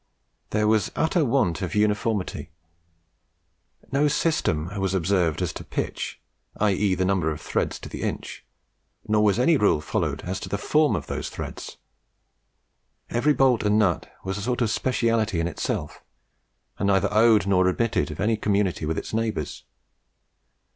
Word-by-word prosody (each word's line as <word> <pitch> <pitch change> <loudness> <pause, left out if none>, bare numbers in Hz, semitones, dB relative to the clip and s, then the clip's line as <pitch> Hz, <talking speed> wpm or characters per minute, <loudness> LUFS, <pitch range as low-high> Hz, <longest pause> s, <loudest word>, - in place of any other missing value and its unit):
There 105 0 +1
was 110 -1 +3
an - - -13
utter 160 +1 +2
want 115 - +1
of 90 0 -3
uniformity. 105 -1 0 1.4
No 140 +2 +3
system 120 - 0
was 95 -1 0
observed 90 -2 +1
as 90 - -2
to - - -7
"pitch," - - -4 0.4
i.e. 100 -2 +2
the 95 +1 0
number 95 -4 +1
of 75 - -4
threads - - -2
to - - -7
the - - -7
inch, - - -4 0.6
nor 105 0 +3
was 105 -2 +3
any 150 +6 +4
rule 105 - +3
followed - - -2
as 95 +2 -3
to - - -7
the 100 - -1
form 150 +2 +2
of 80 -5 -4
those - - -4
threads. - - -7 1.3
Every 130 +6 +3
bolt 125 -2 +3
and 105 0 +2
nut 95 -6 +1
was 95 +1 -3
sort 125 +2 0
of 110 - 0
specialty 115 -6 +1
in 85 - 0
itself, 80 - -4 0.8
and 100 - 0
neither 100 +1 +2
owed 110 -2 +5
nor 95 -2 +3
admitted 110 +1 0
of 75 - -8
any 110 +2 +1
community 100 -6 0
with 80 - -1
its - - -5
neighbours. 110 -9 -2
105 Hz, 160 wpm, -25 LUFS, 95-115 Hz, 1.4 s, owed